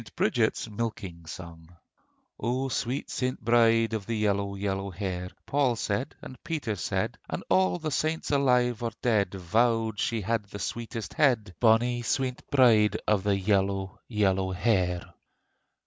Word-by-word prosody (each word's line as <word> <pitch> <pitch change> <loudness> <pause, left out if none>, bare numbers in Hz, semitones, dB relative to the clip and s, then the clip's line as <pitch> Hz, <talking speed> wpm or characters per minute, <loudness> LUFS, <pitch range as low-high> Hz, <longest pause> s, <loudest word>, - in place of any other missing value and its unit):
BRIDGET'S - - +1
MILKING 100 -7 -5
SONG 85 0 -10 0.6
O 130 +3 -1
sweet 125 +2 -2
St. 130 0 -2
Bride 115 0 +3
of 105 -3 -3
the 115 - -1
Yellow, 100 -1 0
yellow 100 0 -2
hair: 90 -1 -4 0.2
Paul 135 -4 +2
said, 110 +4 -2
and 130 - -11
Peter 150 -9 -2
said, 85 - -2
And - - -4
all 95 -1 +3
the 155 - -4
saints 155 +3 -1
alive 125 -4 +2
or 115 -1 -2
dead 105 -6 +2
Vowed 110 +3 +1
she 115 -2 0
had 110 +1 -1
the 100 - -9
sweetest 115 +2 -5
head, 120 - +2
Bonnie 120 +2 +3
sweet 130 +1 -1
St. - - -23
Bride 115 -6 +5
of 105 -2 +3
the 100 0 +1
Yellow, 95 -1 0
yellow 95 -4 +1
hair. 90 -3 0
110 Hz, 150 wpm, -28 LUFS, 95-120 Hz, 0.6 s, Bride